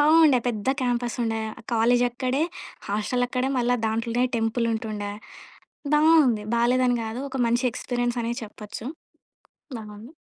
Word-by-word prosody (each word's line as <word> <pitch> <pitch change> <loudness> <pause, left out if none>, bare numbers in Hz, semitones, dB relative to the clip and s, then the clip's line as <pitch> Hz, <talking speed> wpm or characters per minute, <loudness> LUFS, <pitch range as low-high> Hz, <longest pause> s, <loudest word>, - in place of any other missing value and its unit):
బావుండే. 305 -3 +6
పెద్ద 215 -4 -3
క్యాంపసుండే. 240 -2 -1 0.3
కాలేజక్కడే, 245 +4 +2 0.5
హాస్టలక్కడే. 245 +5 0
మళ్ళ 245 0 +1 0.2
దాంట్లోనే 230 +2 0
టెంపులుంటుండే. 225 -2 -1 0.8
బావుంది. 300 -8 +5
బాలేదని 245 +1 +3
గాదు. 225 +4 -4
ఒక 265 - -4
మంచి 240 +2 +1
ఎక్స్పీరియన్స్ 245 0 -2
అనే 230 +1 -1
చెప్పొచ్చు. 215 +1 -8 0.9
బావుంది. 215 +6 -10
240 Hz, 100 wpm, -25 LUFS, 225-250 Hz, 0.9 s, బావుండే